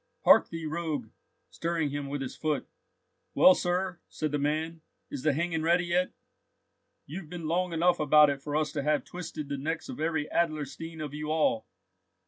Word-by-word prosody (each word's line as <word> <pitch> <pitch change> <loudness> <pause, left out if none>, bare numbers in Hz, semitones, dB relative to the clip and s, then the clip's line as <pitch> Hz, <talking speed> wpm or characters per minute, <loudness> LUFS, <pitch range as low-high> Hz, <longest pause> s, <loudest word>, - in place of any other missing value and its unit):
Hark - - +7
thee, 165 -1 -5
rogue!" 155 -7 -3 0.4
stirring 165 -3 -1
him 145 0 -3
with 140 0 -3
his 130 - -6
foot. 155 -2 -1 0.7
"Well, 275 +1 +8
sir," 180 -5 -1
said 155 -2 -3
the 145 - 0
man, 155 +3 -1 0.3
"is 140 - -4
the 155 - +3
hanging 165 +2 -1
ready 170 +2 +3
yet? 180 +1 +1 0.9
You've 160 +2 -7
been 170 -2 -5
long 180 +2 0
enough 170 +2 +2
about 150 0 +6
it 135 -1 -5
for 145 +1 -4
us 150 -1 +1
to 150 -2 -2
have 150 +1 +1
twisted 170 -4 -6
the 140 -1 -3
necks 160 +3 -3
of - - -6
every 160 -1 0
Adlerstein 160 0 -2
of 145 - -8
you 150 +1 -4
all." 155 -8 +1
155 Hz, 180 wpm, -29 LUFS, 145-170 Hz, 0.9 s, Well